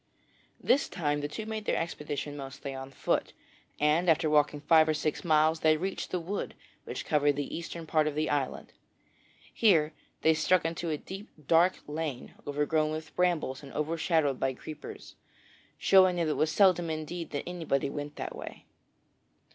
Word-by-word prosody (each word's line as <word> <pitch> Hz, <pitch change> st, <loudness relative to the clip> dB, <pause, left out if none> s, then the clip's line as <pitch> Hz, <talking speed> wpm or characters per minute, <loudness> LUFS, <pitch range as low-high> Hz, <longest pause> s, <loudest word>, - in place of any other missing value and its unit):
This 275 Hz, -, +2 dB
time 145 Hz, -3 st, -1 dB
the 145 Hz, -, -2 dB
two 215 Hz, +9 st, -6 dB
made 220 Hz, -1 st, -4 dB
their -, -, +1 dB
expedition 150 Hz, -3 st, -4 dB
mostly 140 Hz, 0 st, -7 dB
on 135 Hz, 0 st, -7 dB
foot, 135 Hz, -, -1 dB, 0.5 s
and 155 Hz, +4 st, +3 dB
after 160 Hz, -1 st, +3 dB
walking 150 Hz, 0 st, +3 dB
five 160 Hz, +1 st, +5 dB
or 155 Hz, -, +2 dB
six 155 Hz, 0 st, -2 dB
miles 155 Hz, -1 st, +3 dB
they 155 Hz, 0 st, +4 dB
reached 190 Hz, +4 st, -4 dB
a 180 Hz, -, 0 dB
wood 185 Hz, +5 st, -4 dB, 0.3 s
which -, -, -5 dB
covered 145 Hz, -2 st, +3 dB
the 145 Hz, -1 st, -4 dB
eastern 170 Hz, 0 st, -6 dB
part 155 Hz, -1 st, +2 dB
of 150 Hz, -, -2 dB
the 155 Hz, +1 st, 0 dB
island. 140 Hz, -3 st, -2 dB, 0.8 s
Here 165 Hz, -9 st, +4 dB, 0.3 s
they 160 Hz, -, +6 dB
struck 165 Hz, +2 st, +2 dB
into 165 Hz, +1 st, -2 dB
a 155 Hz, -, -1 dB
deep 195 Hz, +7 st, -9 dB, 0.2 s
dark 170 Hz, +3 st, +4 dB
lane 150 Hz, -4 st, -4 dB
overgrown 155 Hz, +2 st, +1 dB
with 155 Hz, 0 st, -6 dB
brambles 170 Hz, -7 st, 0 dB
and 140 Hz, -2 st, -11 dB
overshadowed 155 Hz, -2 st, 0 dB
by 135 Hz, -1 st, 0 dB
creepers, 155 Hz, +4 st, -9 dB, 0.6 s
showing 185 Hz, -2 st, +5 dB
that 170 Hz, -2 st, 0 dB
it -, -, +2 dB
was 155 Hz, +1 st, +1 dB
seldom 180 Hz, -4 st, +4 dB
indeed 160 Hz, +2 st, -4 dB
that 145 Hz, -, -4 dB
anybody 155 Hz, -6 st, -1 dB
went 145 Hz, 0 st, -5 dB
that -, -, -5 dB
way. -, -, -9 dB
155 Hz, 170 wpm, -29 LUFS, 145-170 Hz, 0.8 s, they